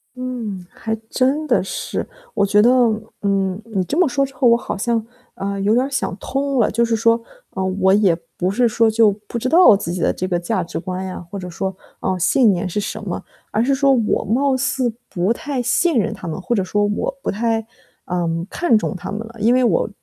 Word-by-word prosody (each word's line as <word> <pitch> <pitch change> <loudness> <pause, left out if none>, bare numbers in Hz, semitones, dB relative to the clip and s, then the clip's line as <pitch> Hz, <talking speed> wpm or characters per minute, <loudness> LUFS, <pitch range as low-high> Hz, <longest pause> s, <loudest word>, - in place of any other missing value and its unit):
嗯， 235 -8 -5
还 220 -1 -4 0.2
真 275 +4 +1
的 245 - +2
是， - - -4 0.3
我 200 - +2
觉 205 +1 +4
得， 235 - +5 0.5
嗯， 195 -1 0
你 210 -5 -2
这 290 - -2
么 355 -5 +4
说 275 +1 +1
之 270 - -11
后 255 0 0
我 235 - +5
好 - - -5
像， 230 +1 0 0.3
呃， 200 0 -3
有 205 +2 +2
点 250 +3 +3
儿 - - -5
想 270 -8 -2
通 275 +3 -1
了。 220 - +3
就 235 +3 +1
是 230 -1 +1
说， 230 +1 +3 0.3
呃， 190 - -3 0.2
我 190 +1 +4
也 200 -4 +4 0.2
不 185 +1 0
是 240 +3 +3
说 225 0 +3
就 220 -1 +5 0.2
不 235 - -3
知 240 - -2
道 330 - +7
自 185 - -5
己 180 - -3
的 - - +3
这 185 - -3
个 175 -2 0
价 175 0 -1
值 170 - -6
观 185 +2 -4
呀， 185 -1 -6
或 200 - -5
者 180 -1 -6
说， 190 +2 -3 0.3
呃， 185 -1 -1
信 225 +5 +4
念 180 0 -1
是 185 - -5
什 - - -5
么， - - -4 0.3
而 220 - +1
是 275 +3 +2
说 275 0 +4
我 230 -4 +1
貌 260 +6 +2
似 260 -3 0 0.2
不 180 +5 0
太 280 0 -2
信 290 +5 +2
任 220 0 +1
它 185 -5 -8
们， 165 +4 -4
或 190 - -1
者 205 - +2
说 205 +3 0
我 - - -2
不 - - 0
太， 225 +1 -1 0.4
嗯， 170 -1 -1
看 345 -11 +2
重 215 - -2
它 - - -7
们 210 - -3
了。 230 - -15
因 225 +4 +3
为 255 0 +3
我 220 -2 +2
220 Hz, 250 characters per minute, -20 LUFS, 190-250 Hz, 0.5 s, 道